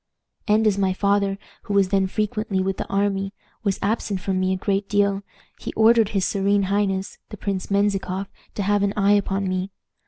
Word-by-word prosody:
"And 215 Hz, +1 st, +3 dB
as 205 Hz, -2 st, +2 dB
my 190 Hz, -1 st, +2 dB
father, 200 Hz, 0 st, +1 dB, 0.3 s
who 205 Hz, -, -2 dB
was 195 Hz, -2 st, +4 dB
then 195 Hz, -1 st, +2 dB
frequently 210 Hz, -1 st, -1 dB
with 190 Hz, 0 st, -1 dB
the -, -, -4 dB
army, 195 Hz, 0 st, -1 dB, 0.3 s
was 200 Hz, -3 st, 0 dB
absent 205 Hz, -1 st, -1 dB
from 185 Hz, 0 st, -1 dB
me 185 Hz, 0 st, +1 dB
a -, -, +1 dB
great 195 Hz, +1 st, -1 dB
deal, 200 Hz, -1 st, +2 dB, 0.4 s
he -, -, -5 dB
ordered 225 Hz, -1 st, +5 dB
his 195 Hz, -3 st, 0 dB
serene 200 Hz, 0 st, +1 dB
highness, 195 Hz, -2 st, -1 dB
the 210 Hz, -, -8 dB
Prince 195 Hz, -1 st, -3 dB
Menzikoff, 200 Hz, -1 st, 0 dB, 0.3 s
to 205 Hz, -, -1 dB
have 205 Hz, +1 st, +2 dB
an 200 Hz, 0 st, +1 dB
eye 200 Hz, 0 st, +4 dB
upon 195 Hz, -1 st, +1 dB
me. 185 Hz, +1 st, -2 dB
200 Hz, 190 wpm, -23 LUFS, 195-205 Hz, 0.4 s, ordered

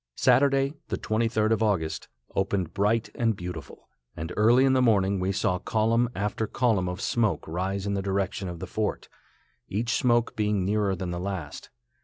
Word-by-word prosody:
Saturday, 135 Hz, 0 st, +3 dB
the -, -, -2 dB
23d 110 Hz, 0 st, 0 dB
of 110 Hz, -, +2 dB
August, 85 Hz, -8 st, 0 dB, 0.3 s
opened 95 Hz, -3 st, -1 dB
bright 105 Hz, +3 st, +1 dB
and 115 Hz, -2 st, +1 dB
beautiful, 90 Hz, -5 st, -8 dB, 0.3 s
and 80 Hz, +2 st, -5 dB
early 120 Hz, +5 st, +5 dB
in 135 Hz, -, +4 dB
the 130 Hz, -, +3 dB
morning 100 Hz, -5 st, +3 dB
we 95 Hz, +1 st, 0 dB
saw 90 Hz, -2 st, 0 dB
column 115 Hz, +4 st, +1 dB
after 105 Hz, +2 st, -2 dB
column 105 Hz, -8 st, +1 dB
of 90 Hz, +1 st, -5 dB
smoke 105 Hz, -10 st, 0 dB
rise 95 Hz, +4 st, -2 dB
in 100 Hz, -, -1 dB
the 100 Hz, -, -1 dB
direction 95 Hz, -1 st, -2 dB
of 85 Hz, -, -6 dB
the 95 Hz, -, -6 dB
fort, 105 Hz, +3 st, -3 dB, 0.6 s
each 115 Hz, +4 st, -1 dB
smoke 120 Hz, +2 st, +2 dB
being 105 Hz, -3 st, 0 dB
nearer 100 Hz, -1 st, +1 dB
than 90 Hz, 0 st, -4 dB
the 85 Hz, -, -3 dB
last. 90 Hz, -6 st, -5 dB
100 Hz, 175 wpm, -27 LUFS, 95-115 Hz, 0.6 s, early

